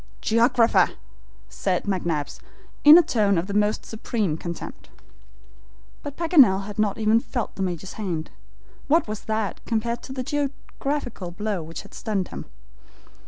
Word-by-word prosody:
"Geographer!" 230 Hz, +1 st, +3 dB, 0.6 s
said 180 Hz, -, -1 dB
McNabbs, 170 Hz, -7 st, -2 dB, 0.4 s
in 300 Hz, +2 st, +11 dB
a 350 Hz, -, +7 dB
tone 210 Hz, -, +2 dB
of 165 Hz, -, 0 dB
the 200 Hz, -, -5 dB
most 210 Hz, +1 st, +1 dB
supreme 215 Hz, -6 st, -2 dB
contempt. 170 Hz, +1 st, -7 dB, 1.1 s
But 285 Hz, -1 st, -7 dB
Paganel 275 Hz, -, +5 dB
had 210 Hz, 0 st, -7 dB
not 210 Hz, -2 st, +1 dB
even 220 Hz, +1 st, +3 dB
felt 240 Hz, -1 st, -4 dB
the -, -, -7 dB
Major's 185 Hz, 0 st, -3 dB
hand. 175 Hz, -7 st, -4 dB, 0.6 s
What 325 Hz, 0 st, +3 dB
was 215 Hz, 0 st, -6 dB
that 220 Hz, -2 st, -2 dB
compared 235 Hz, +1 st, -1 dB
to -, -, -10 dB
the 260 Hz, -1 st, -3 dB
geographical 280 Hz, -6 st, -3 dB
blow 205 Hz, +1 st, -3 dB
which 160 Hz, +1 st, -8 dB
had -, -, -16 dB
stunned 200 Hz, -5 st, -2 dB
him? -, -, -7 dB
215 Hz, 145 wpm, -24 LUFS, 190-245 Hz, 1.1 s, in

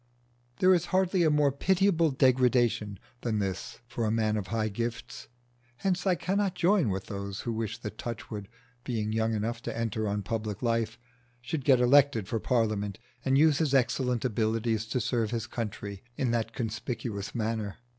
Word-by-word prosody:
There 185 Hz, +6 st, +5 dB
is 175 Hz, -1 st, +2 dB
hardly 185 Hz, -1 st, +2 dB
a 160 Hz, -, +5 dB
more 150 Hz, -2 st, +3 dB
pitiable 175 Hz, +2 st, +3 dB
degradation 125 Hz, -6 st, +2 dB, 0.2 s
than 115 Hz, -3 st, -1 dB
this 95 Hz, +3 st, -3 dB
for 120 Hz, 0 st, -3 dB
a 110 Hz, -, +1 dB
man 110 Hz, -1 st, +1 dB
of 105 Hz, -3 st, -3 dB
high 110 Hz, +1 st, 0 dB
gifts. 115 Hz, +2 st, -5 dB, 0.5 s
Hence 190 Hz, +3 st, -1 dB
I 185 Hz, -, +4 dB
cannot 195 Hz, +3 st, 0 dB
join 180 Hz, -, +3 dB
with 95 Hz, 0 st, -2 dB
those 100 Hz, -1 st, -5 dB
who 120 Hz, -, -3 dB
wish 110 Hz, -2 st, -3 dB
that 105 Hz, 0 st, -7 dB
Touchwood, 110 Hz, -3 st, -5 dB, 0.4 s
being 110 Hz, -4 st, -2 dB
young 110 Hz, 0 st, +1 dB
enough 115 Hz, +3 st, -2 dB
to -, -, -5 dB
enter 110 Hz, -1 st, -1 dB
on 100 Hz, 0 st, -1 dB
public 110 Hz, +1 st, -3 dB
life, 115 Hz, -1 st, 0 dB, 0.4 s
should 130 Hz, +4 st, -4 dB
get 130 Hz, -1 st, +5 dB
elected 125 Hz, -4 st, +4 dB
for 115 Hz, -, -1 dB
Parliament 110 Hz, -4 st, 0 dB, 0.3 s
and 135 Hz, 0 st, +3 dB
use 150 Hz, -1 st, +5 dB
his 150 Hz, -4 st, +2 dB
excellent 125 Hz, -1 st, +1 dB
abilities 110 Hz, -1 st, 0 dB
to 125 Hz, +3 st, -1 dB
serve 115 Hz, -1 st, 0 dB
his 115 Hz, -1 st, -2 dB
country 100 Hz, -4 st, -5 dB, 0.2 s
in 125 Hz, -3 st, +1 dB
that 115 Hz, -1 st, 0 dB
conspicuous 115 Hz, -3 st, -4 dB
manner. 110 Hz, -3 st, -2 dB
115 Hz, 170 wpm, -29 LUFS, 110-135 Hz, 0.5 s, There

